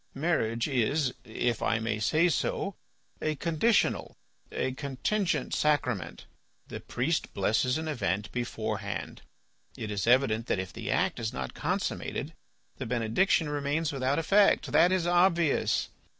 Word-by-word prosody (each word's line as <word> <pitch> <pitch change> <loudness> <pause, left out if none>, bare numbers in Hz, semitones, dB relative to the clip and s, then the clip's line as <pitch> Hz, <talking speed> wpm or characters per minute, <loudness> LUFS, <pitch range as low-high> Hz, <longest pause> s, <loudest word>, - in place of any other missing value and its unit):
Marriage 135 -7 0
is, 135 +1 +1
if 115 +1 -2
I 115 - +2
may 110 -1 -2
say 155 +10 +3
so, 185 +4 -1 0.5
a 155 0 0
conditional, 170 +9 +1 0.3
a 130 - -1
contingent 145 +9 -1
sacrament. 125 - 0 0.4
The - - -6
priest - - -2
blesses 125 +5 +1
an 160 0 -4
event 105 - -2
beforehand; 110 -5 -4 0.6
it 110 - -5
is 100 0 -2
evident 120 -2 +3
that - - +1
if 95 -1 -5
the - - -6
act - - +1
is 110 -1 -2
not 65 -1 -5
consummated - - -3 0.4
the - - -5
benediction 125 - +2
remains 145 +2 -1
without 135 0 0
effect. 195 +5 +3
That 175 - +5
is 185 -2 +1
obvious. 175 -3 +2
135 Hz, 135 wpm, -29 LUFS, 110-160 Hz, 0.6 s, That